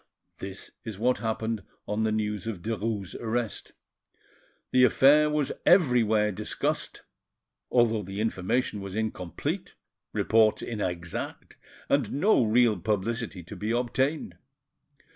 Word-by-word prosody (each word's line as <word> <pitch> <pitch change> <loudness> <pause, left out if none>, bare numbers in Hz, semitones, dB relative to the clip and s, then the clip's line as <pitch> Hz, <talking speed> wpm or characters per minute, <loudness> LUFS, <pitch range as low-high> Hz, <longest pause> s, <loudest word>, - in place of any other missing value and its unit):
This 95 0 -7
is 110 -5 -6
what 125 +4 +1
happened 110 -1 -2 0.3
on 105 +1 -1
the 110 0 +1
news 105 -1 -2
of 100 -7 -5
Derues' 110 -4 -3
arrest. 115 -2 -3 1.0
The 125 - +5
affair 145 +4 +6
was 150 -2 0
everywhere 115 - +4
discussed, 95 - -3 0.7
although 115 -3 +3
the 95 +1 -6
information 105 +1 -1
was 100 -1 -6
incomplete, 105 -6 -3 0.4
reports 110 -1 +3
inexact, 90 -6 -4 0.3
and 140 -7 +1
no 165 - +4
real 115 -2 +3
publicity 105 0 -2
to - - -9
be 105 - -4
obtained. 130 +5 -1
110 Hz, 115 wpm, -27 LUFS, 105-120 Hz, 1.0 s, affair